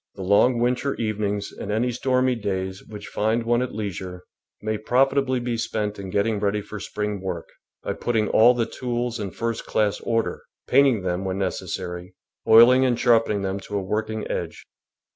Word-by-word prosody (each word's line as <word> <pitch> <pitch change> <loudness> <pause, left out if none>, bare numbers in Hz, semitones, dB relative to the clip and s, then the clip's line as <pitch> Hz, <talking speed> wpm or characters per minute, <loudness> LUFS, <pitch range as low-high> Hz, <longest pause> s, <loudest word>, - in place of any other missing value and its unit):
The 95 - -6
long 100 +6 +4
winter 125 +3 0
evenings 105 -2 -2
and 100 - -6
any 120 +4 +1
stormy 130 +1 +1
days 95 -4 -3
which 105 -1 -10
find 110 +2 0
one 120 +1 +2
at 125 -4 -4
leisure 95 -3 -5 0.4
may 110 0 -1
profitably 130 +3 +2
be 120 -1 -2
spent 105 -2 -2
in 95 -1 -6
getting 105 +2 0
ready 100 0 0
for 105 +1 -8
spring 105 -1 -4
work, 90 -3 -4 0.4
by - - -2
putting 110 -3 0
all 120 +3 +6
the 120 -1 +1
tools 120 -1 -3
in 100 -2 -3
first 115 +3 -4
class 105 -2 +1
order, 115 -6 -1 0.3
painting 135 -8 +4
them 90 +1 -1
when 95 0 -2
necessary, 90 -1 -4 0.3
oiling 120 +4 +8
and 125 -2 +1
sharpening 115 -4 +3
them 95 +1 -2
to 100 +1 -5
a 100 - -2
work 110 +3 -2
ing 110 0 -4
edge. - - -5
110 Hz, 180 wpm, -24 LUFS, 100-120 Hz, 0.4 s, oiling